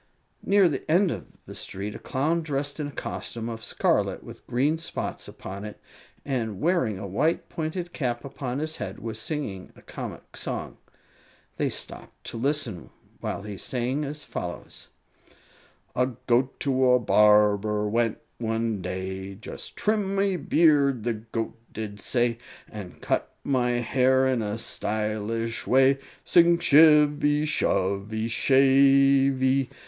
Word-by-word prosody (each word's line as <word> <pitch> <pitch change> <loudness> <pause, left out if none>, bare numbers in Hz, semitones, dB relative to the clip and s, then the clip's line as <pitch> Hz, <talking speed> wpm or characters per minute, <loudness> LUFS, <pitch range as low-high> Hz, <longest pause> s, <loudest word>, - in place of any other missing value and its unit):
Near 200 -2 +4
the 145 -3 -3
end 180 +2 +4
of - - -6 0.2
the - - -9
street 100 +2 -5
a - - -8
Clown, 155 +6 0
dressed 145 -1 -3
in 150 - -2
a - - -7
costume 115 -4 -5
of 115 -1 -6
scarlet - - 0
with - - -12
green 145 +6 +1
spots 165 - -4
upon 100 +1 -8
it, 105 -1 -8 0.5
and 115 -8 -2
wearing 160 - +1
a 100 - -6
white, 140 - 0
pointed 170 +2 -4
cap 120 -4 -2
upon 130 -2 -4
his 155 +2 -2
head, 95 -2 -5
was 110 0 -5
singing 110 - -4
a - - -17
comic - - -8
song. - - -5 0.8
They - - +1
stopped - - -8
to - - -6
listen 130 - -2 0.3
while 100 - -4
he 105 -2 -7
sang 130 +7 -2
as 150 +1 -5
follows: 85 0 -7 1.1
A 125 0 +2 0.2
goat 125 +2 +1
to 130 -2 +2
a 125 - +5
barber 105 -1 +4
went 115 +1 +1 0.2
one 115 -2 -1
day; 95 +1 -5
"Just 105 - -8
trim 205 -2 0
my 195 -1 +2
beard," 145 -8 +3
the 120 0 0
goat 115 +1 -5
did 105 -2 -6
say, 120 +1 0 0.3
"And 100 -5 -9
cut - - -1
my 125 -3 +1 0.2
hair 130 +2 +3
in 130 -3 +1
a 105 0 -2
stylish 110 +1 -3
way" 135 +1 +4 0.3
Sing 170 0 +5
shivvy, 150 -2 +5
shovvy, 100 -4 0
shavey! 135 +1 +4
125 Hz, 140 wpm, -26 LUFS, 105-145 Hz, 1.1 s, a